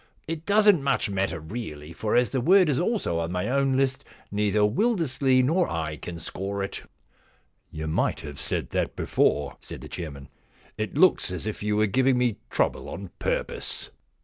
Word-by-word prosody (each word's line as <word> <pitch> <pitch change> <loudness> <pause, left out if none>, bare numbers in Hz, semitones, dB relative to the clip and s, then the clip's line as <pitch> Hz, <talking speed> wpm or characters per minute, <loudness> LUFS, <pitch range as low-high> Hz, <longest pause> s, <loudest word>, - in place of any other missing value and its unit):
* - - -37
It 165 0 -5
doesn't 205 -4 +5
much 135 -6 +1
matter 95 -4 -1
really, 80 -4 -7
for 105 +5 -1
as 125 0 +3
the 130 - 0
word 180 +4 +5
is 140 - +1
also 175 - 0
on 85 0 -2
my 90 +2 -1
own 135 +1 +2
list 135 -1 +1 0.3
neither 105 0 +1
Wildersley 130 - +2
nor 170 +7 +2
I 80 -2 -2
can 85 +3 -7
score 100 +4 -4
it.' 95 - -5 0.5
* - - -39
You 80 0 -5
might 80 - 0
have 75 -3 -8
said - - -2
that - - -1
before,' 70 -1 +1
said - - -8
the - - -8
chairman. 70 -6 -7 0.3
* - - -30
It 110 +5 -3
looks 185 +3 +4
as 90 0 -5
if 110 - -4
you 105 0 0
were 110 - +4
giving 130 +5 +3
me 125 -3 +1
trouble - - 0
on 100 -2 -7
purpose.' - - -3
110 Hz, 190 wpm, -26 LUFS, 85-135 Hz, 0.5 s, doesn't